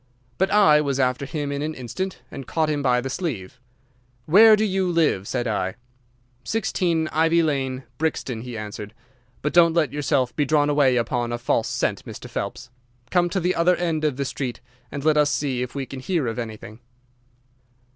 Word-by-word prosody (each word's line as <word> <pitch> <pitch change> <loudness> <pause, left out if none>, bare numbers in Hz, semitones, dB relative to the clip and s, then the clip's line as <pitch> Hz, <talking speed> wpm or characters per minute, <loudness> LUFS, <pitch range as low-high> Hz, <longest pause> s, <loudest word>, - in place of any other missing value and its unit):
"But 190 +1 +2
I 160 -8 +5
was 140 -2 -1
after 130 +1 0
him 145 -1 -3
in 140 0 -3
an 155 +1 -3
instant 130 +10 -5
and 135 -2 -8
caught 160 -2 0
him 145 -1 -1
by 125 -2 +2
the 135 - -4
sleeve. 125 - -4 0.7
"'Where 215 +7 +8
do 215 +1 +1
you 190 -2 0
live?' 155 - +1
said 125 -2 -2
I. 95 -4 -1 0.7
"'16 170 - 0
Ivy 165 +2 +3
Lane, 135 -4 -1 0.2
Brixton,' 135 -7 -2
he 120 -1 -7
answered. 105 0 -7 0.5
'But 150 - -1
don't 170 -1 +5
let 155 -7 +1
yourself 140 -3 0
be 150 - +2
drawn 145 0 +2
away 140 -3 +3
upon 120 0 -1
a 120 - -1
false 120 - 0
scent, - - -1
Mr. - - -9
Phelps. 130 -1 -5 0.4
Come 175 -1 +3
to 190 - -1
the 180 +1 +1
other 175 +2 +3
end 165 -3 -1
of 150 -4 0
the 140 - -1
street 130 -2 -4 0.3
and 140 0 -5
let 155 -1 +4
us 150 -1 +4
see 135 -5 -1
if 125 +1 -5
we 140 -1 -3
can 135 0 -8
hear 165 +1 -1
of 115 +1 -3
anything. 110 -1 -7
145 Hz, 190 wpm, -23 LUFS, 125-165 Hz, 0.7 s, Where